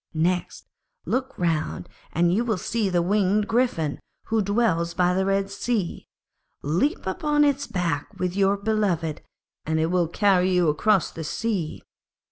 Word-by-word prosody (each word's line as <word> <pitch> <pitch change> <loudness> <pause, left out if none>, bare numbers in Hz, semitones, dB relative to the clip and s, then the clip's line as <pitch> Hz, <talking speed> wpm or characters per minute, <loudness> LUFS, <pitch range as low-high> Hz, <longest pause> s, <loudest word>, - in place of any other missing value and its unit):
Next, 175 +3 -1 0.4
look 260 +1 -2
round, 165 -3 -1 0.2
and 170 +1 +2
you 220 +5 +2
will 225 -5 0
see 215 +2 -1
the 175 -2 +1
winged 205 +2 +2
Griffin, 220 - 0 0.3
who 225 -1 +2
dwells 195 -5 +1
by 180 0 +3
the 190 +1 0
Red 195 0 0
Sea, 200 -3 -2 0.6
leap 185 - 0
upon 300 -3 +1
its 285 -1 +1
back 170 -6 -1
with 180 0 -2
your 200 0 +3
beloved, 195 -7 -1 0.4
and 160 0 -1
it 160 +2 +1
will 180 -2 +2
carry 185 +1 +2
you 180 -3 +3
across 190 +5 +2
the 160 - -7
sea. 185 -1 -3
190 Hz, 150 wpm, -24 LUFS, 170-215 Hz, 0.6 s, by